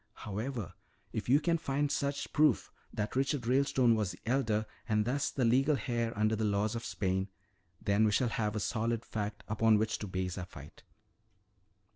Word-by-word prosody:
"However, 105 -2 -4 0.4
if - - -3
you 140 +3 +6
can 165 +1 +1
find 145 -1 0
such 140 0 -2
proof, 150 -5 +3 0.2
that 105 +2 -3
Richard 135 -1 0
Ralestone 130 -1 +3
was 105 -4 0
the 90 - -13
elder 115 -3 +1 0.2
and 105 -1 +2
thus 140 +5 0
the 130 - 0
legal 135 +5 +3
heir 120 -3 0
under 110 +1 +2
the 110 - -2
laws 105 0 +1
of 115 - -4
Spain, 95 0 -1 0.5
then 100 +2 +2
we 105 - +3
shall 125 +3 +2
have 105 -2 -1
a - - 0
solid 115 +2 -1
fact 105 -1 -4
upon 110 0 +4
which 110 +1 0
to 105 - -5
base 95 0 -3
our 90 - -4
fight." 75 -5 -12
110 Hz, 180 wpm, -32 LUFS, 105-130 Hz, 0.5 s, you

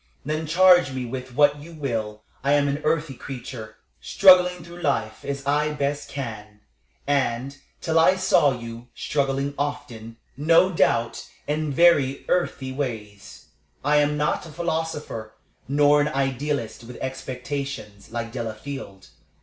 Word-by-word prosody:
Then 155 +2 -2
charge 180 -2 +6
me 130 -1 -3
with 130 0 -7
what 145 0 +4
you 165 +3 -11
will. 110 -7 -3 0.2
I 140 +1 +3
am 145 -1 +3
an 140 +2 -1
earthy 155 -2 0
creature, 120 -4 -8 0.3
struggling 180 -2 +5
through 175 +1 -11
life 110 -8 -1
as 140 -1 -4
I 150 +2 +1
best 145 0 -2
can, 105 -6 -7 0.4
and, 135 -1 0 0.3
till 160 0 +2
I 185 +3 +5
saw 185 -6 +4
you, 115 -1 -7
struggling 140 -1 -1
often, 120 -6 -4 0.2
no 165 +6 +4
doubt, 120 -8 +1 0.2
in 150 0 -1
very 140 -3 +4
earthy 140 -7 0
ways. 110 -7 -6 0.4
I 150 +1 +4
am 150 0 +2
not 150 +3 -1
a - - -11
philosopher, 160 -8 -4 0.3
nor 145 +2 +4
an 145 - +1
idealist, 135 -4 -2
with 120 +1 -10
expectations, 130 -5 -5
like 115 0 -4
Delafield. 115 -3 -7
140 Hz, 135 wpm, -24 LUFS, 120-150 Hz, 0.4 s, charge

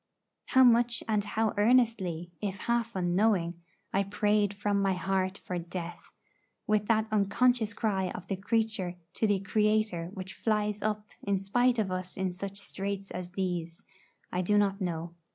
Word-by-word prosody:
How 260 - +6
much 240 -1 +4
and 210 -2 +1
how 220 +1 0
earnestly, 205 -7 +2
if 195 -2 -3
half 235 -1 0
unknowing, 175 -1 +1 0.3
I 195 - +3
prayed 205 0 +1
from 205 0 0
my 195 -1 +2
heart 190 +1 -1
for 180 -1 -4
death, 175 0 -7 0.5
with 210 -1 +1
that 220 -1 +2
unconscious 215 +2 +2
cry 195 -5 0
of 180 - -7
the 195 - -2
creature 215 -3 -1 0.2
to 220 - +1
the 205 -2 +2
Creator 210 -4 +1
which 190 0 -6
flies 210 -1 0
up 210 -1 -2
in 200 -1 0
spite 245 +6 +2
of 205 -4 0
us 185 0 -4
in 190 -1 -1
such 195 +2 -6
straits 200 0 -4
as 180 0 -6
these, 175 -3 -3 0.5
I 180 - 0
do 205 +3 +2
not 200 -1 +2
know. 170 -2 -3
200 Hz, 160 wpm, -30 LUFS, 185-215 Hz, 0.5 s, How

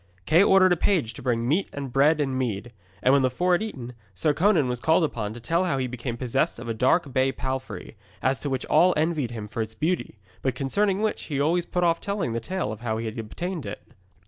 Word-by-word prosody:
Kay 165 +4 +5
ordered 190 -2 +6
a - - -1
page 160 - +1
to - - -10
bring 120 -2 0
meat 165 +9 +1
and 140 -3 -6
bread 150 +3 +4
and 135 -3 0
mead, 120 -2 -3 0.3
and 130 - +5
when 140 - +5
the 130 - +3
four 180 +9 0
had 175 - +3
eaten, 130 - -6 0.2
Sir 150 - +1
Conan 165 -3 +3
was 125 -1 -2
called 160 +6 +3
upon 110 -9 -2
to - - -8
tell 170 +9 0
how 160 -7 0
he 130 - 0
became 120 -1 -5
possessed 135 +6 0
of 120 +1 -8
a 115 - -1
dark 130 +5 +2
bay 130 +1 +2
palfrey, 130 -2 -5 0.2
as 130 +1 0
to 145 - -3
which 130 -1 -2
all 180 +1 +4
envied 155 -5 0
him 110 -3 -6
for 115 +2 -4
its 110 0 -5
beauty, 160 -2 -2 0.2
but 130 -2 -1
concerning 195 +10 0
which 215 - -1
he 145 -3 -3
always 170 +4 +1
put 180 - -1
off 170 -1 +2
telling 200 - -2
the 115 - -1
tale 175 - -3
of 110 - -7
how 115 -2 -2
he 115 - -4
had 110 +1 -5
obtained 170 - -4
it. 100 - -8
135 Hz, 245 wpm, -25 LUFS, 120-170 Hz, 0.3 s, ordered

